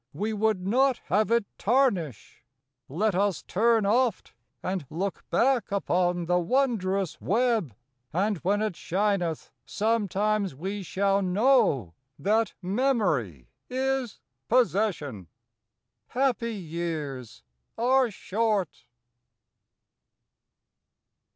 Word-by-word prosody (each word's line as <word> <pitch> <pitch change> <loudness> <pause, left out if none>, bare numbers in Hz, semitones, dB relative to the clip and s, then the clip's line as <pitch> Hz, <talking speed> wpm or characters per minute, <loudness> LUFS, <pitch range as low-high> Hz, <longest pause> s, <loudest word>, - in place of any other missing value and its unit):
6 - - -22
1 - - -11
We 220 +1 0
would 210 -3 0
not 255 +5 +3
have 210 +4 +2
it 235 -2 +2
tarnish; 195 - 0 0.5
let 200 +9 0
us 195 +1 0
turn 225 +1 +2
Oft 235 +3 +1 0.3
and 185 -6 -3
look 190 +4 -4
back 245 +6 +2
upon 180 -3 0
the 180 +1 +2
wondrous 195 - 0
web, 220 - +1 0.4
And 200 +5 0
when 205 +6 +1
it 215 -5 -2
shineth 185 -4 -1
sometimes 210 -3 0
we 195 +7 -4
shall 195 +2 +1
know 185 - +2 0.2
That 220 +3 +1
memory 180 - 0 0.2
is 260 -2 -1 0.3
possession. 195 - +1 0.8
Happy 245 -3 0
years 155 - -5 0.3
are 255 +1 +3
short. 210 -3 -2
200 Hz, 100 wpm, -27 LUFS, 175-230 Hz, 0.8 s, not